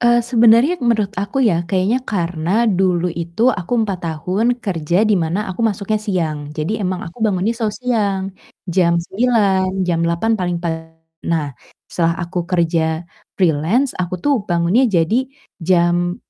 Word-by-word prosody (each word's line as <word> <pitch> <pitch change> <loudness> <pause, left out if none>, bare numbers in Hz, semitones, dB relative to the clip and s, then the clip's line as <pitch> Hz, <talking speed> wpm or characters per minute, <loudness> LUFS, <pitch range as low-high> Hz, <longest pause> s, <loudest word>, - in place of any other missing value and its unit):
Eee, 240 -1 +3
sebenarnya 240 +7 +4
menurut 220 -5 +1
aku 245 +6 0
ya 170 -7 +2
kayaknya 195 +7 +1
karena 180 -1 -1
dulu 180 -4 +1
itu 170 +10 0
aku 180 +5 -5
4 195 -3 -3
tahun 185 +10 0
kerja 180 -4 0
di 215 - +2
mana 170 +6 -1
aku 180 - -8
masuknya 215 -1 0
siang. 175 -8 -2 0.2
Jadi 175 +8 -2
emang 185 -2 -2
aku 175 +7 -11
bangunnya 210 0 +1
selalu 225 -3 -2
siang, 215 -6 0 0.4
jam 175 -2 +2
9.00, 190 -1 +1
jam 170 -2 0
8.00 170 +7 0
paling 175 -1 -1
pa 170 - -1 0.6
Nah, 155 -4 -1 0.3
setelah 170 -1 -1
aku 175 0 -4
kerja 165 -2 0 0.3
freelance 185 - +1
aku 180 0 -3
tuh 290 - +3
bangunnya 175 +9 +2
jadi 210 +8 +1 0.3
jam 175 0 +2
185 Hz, 145 wpm, -18 LUFS, 170-225 Hz, 0.6 s, sebenarnya